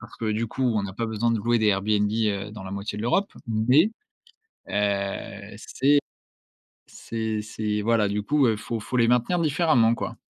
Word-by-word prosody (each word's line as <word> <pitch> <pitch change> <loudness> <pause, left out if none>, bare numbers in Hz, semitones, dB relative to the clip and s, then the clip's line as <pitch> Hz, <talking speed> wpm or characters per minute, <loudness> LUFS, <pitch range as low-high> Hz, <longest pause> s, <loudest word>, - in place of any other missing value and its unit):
parce 110 +2 -13
que 110 -2 -2
du 110 +2 -1
coup, 130 - -5
on 100 -2 0
a 95 - -8
pas 115 - -2
besoin 110 +1 0
de 115 - +2
louer 120 +2 +1
des 110 - +1
Airbnb, 105 +1 +2
heu, 105 -2 -1
dans 105 -3 -8
la 95 - -7
moitié 100 +1 -5
de 105 - -4
l'Europe, 195 - +1 0.2
mais, 125 - +3 0.8
heu, 100 0 -2
c'est 140 +6 +2 0.9
c'est 110 -1 -4
c'est 105 -1 -3
voilà 115 -1 +2
du 105 +1 -1
coup, 145 +3 +2
heu, 110 -2 +2
faut 115 +2 -4
faut 125 +4 -4
les 115 -1 +4
maintenir 125 +9 +2
différemment 140 -7 +3
quoi. - - -5
110 Hz, 190 wpm, -25 LUFS, 105-120 Hz, 0.9 s, les